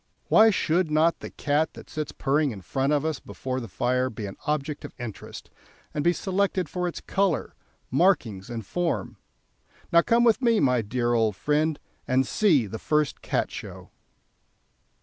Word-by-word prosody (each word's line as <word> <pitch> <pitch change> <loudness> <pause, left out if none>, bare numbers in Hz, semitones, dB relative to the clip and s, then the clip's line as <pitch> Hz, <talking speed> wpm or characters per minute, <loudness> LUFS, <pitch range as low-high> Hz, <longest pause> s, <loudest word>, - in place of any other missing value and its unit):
Why 220 +1 +7
should 180 -4 +1
not 155 +2 +3
the - - -7
cat 150 +2 0
that - - -11
sits 155 -1 -4
purring 145 +2 +1
in 105 -6 -7
front 135 - -1
of 150 0 +1
us 160 -4 -1
before 130 0 -5
the 115 - -6
fire 125 +2 0
be 110 -3 -6
an 95 - -7
object 150 0 -2
of - - -9
interest, 120 -4 -8 0.4
and 145 - -1
be 175 - +4
selected 190 0 0
for 180 -1 -2
its 175 - -5
colour, 195 -6 0 0.4
markings, 125 - +2
and 115 -3 -5
form? 175 - -2 0.8
Now 170 - +8
come 235 +5 +3
with 235 +1 +4
me, 230 -3 +3
my 125 -3 +3
dear 120 +2 -1
old 110 -3 +2
friend, 150 +5 0 0.3
and 130 +1 +2
see 155 - +3
the 110 +2 -6
first 150 -2 0
Cat - - -1
Show." - - -9
150 Hz, 170 wpm, -26 LUFS, 125-175 Hz, 0.8 s, Now